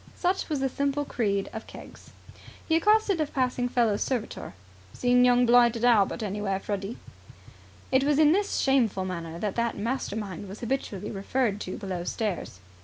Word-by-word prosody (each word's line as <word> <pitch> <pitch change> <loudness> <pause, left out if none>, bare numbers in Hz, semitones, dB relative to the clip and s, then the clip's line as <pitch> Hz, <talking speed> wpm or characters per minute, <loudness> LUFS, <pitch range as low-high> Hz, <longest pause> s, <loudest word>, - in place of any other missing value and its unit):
Such 365 +1 -1
was 295 -3 -1
the 270 - +2
simple 280 +2 -1
creed 200 -7 -1
of 220 0 -7
Keggs. - - -12 0.6
He 320 - +2
accosted 410 0 +3
a 305 - 0
passing 250 -3 -1
fellow 230 -4 +2
servitor. 230 - -3 0.4
"Seen 245 0 +3
young 245 0 +5
blighted 240 -1 +4
Albert 225 -1 +3
anywhere, 200 -1 -2
Freddy?" 200 +2 -4 0.9
It 265 0 +4
was 290 0 +2
in 305 -1 +6
this 400 +4 +1
shameful 235 -8 +2
manner 170 -3 -5
that 205 +2 -3
that 235 0 0
mastermind 205 -4 -4
was 200 - -9
habitually 225 -5 -3
referred 210 +1 -1
to 185 - -5
below 185 -4 -4
stairs. 195 - -3
235 Hz, 160 wpm, -27 LUFS, 200-270 Hz, 0.9 s, in